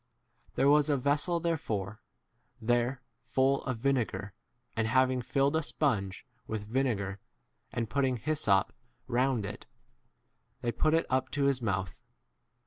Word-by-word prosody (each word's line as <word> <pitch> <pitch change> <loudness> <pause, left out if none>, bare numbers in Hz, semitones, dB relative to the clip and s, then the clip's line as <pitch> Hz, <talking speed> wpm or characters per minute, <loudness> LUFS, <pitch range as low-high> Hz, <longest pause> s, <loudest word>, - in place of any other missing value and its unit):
There 135 - +3
was 150 +1 +5
a 145 - +3
vessel 145 +6 +1
therefore 110 - -2 0.6
there 120 +3 0 0.2
full 130 +4 +1
of 125 -3 -2
vinegar, 120 -5 -1 0.4
and 110 -1 +1
having 130 +2 +3
filled 140 +4 +1
a 160 - +3
sponge 110 - -1 0.2
with 110 -2 -3
vinegar, 105 -5 -1 0.5
and 115 -1 -2
putting 130 +1 +1
hyssop 110 -7 +1 0.3
round 125 -2 +1
it, - - -7
f - - -43
they 120 - 0
put 155 +6 +2
it 165 - +2
up 130 0 +1
to 145 - +1
his 140 -2 +2
mouth. 95 -5 -2
130 Hz, 135 wpm, -30 LUFS, 110-140 Hz, 0.6 s, was